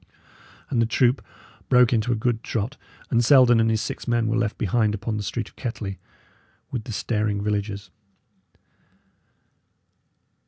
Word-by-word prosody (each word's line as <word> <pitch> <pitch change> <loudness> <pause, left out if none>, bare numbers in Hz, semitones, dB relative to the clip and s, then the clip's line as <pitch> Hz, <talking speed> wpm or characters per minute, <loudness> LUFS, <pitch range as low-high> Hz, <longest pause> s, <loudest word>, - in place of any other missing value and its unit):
And 120 -4 +2
the 115 - +2
troop 125 +2 +2 0.5
broke 125 -1 +5
into 115 +1 +1
a - - +2
good 115 0 -1
trot, 115 +5 -3 0.4
and 120 -2 +3
Selden 120 -2 +6
and 115 0 +3
his 110 -1 +1
six - - -6
men 120 -1 +1
were 110 +1 0
left 115 -3 -1
behind 105 +1 +1
upon 110 +1 -3
the - - -2
street 105 +1 -3
of - - -28
Kettley, 105 -6 -5 0.7
with 120 -4 -4
the - - -6
staring 105 -1 -1
villagers. 100 -2 -3
115 Hz, 150 wpm, -24 LUFS, 105-120 Hz, 0.7 s, Selden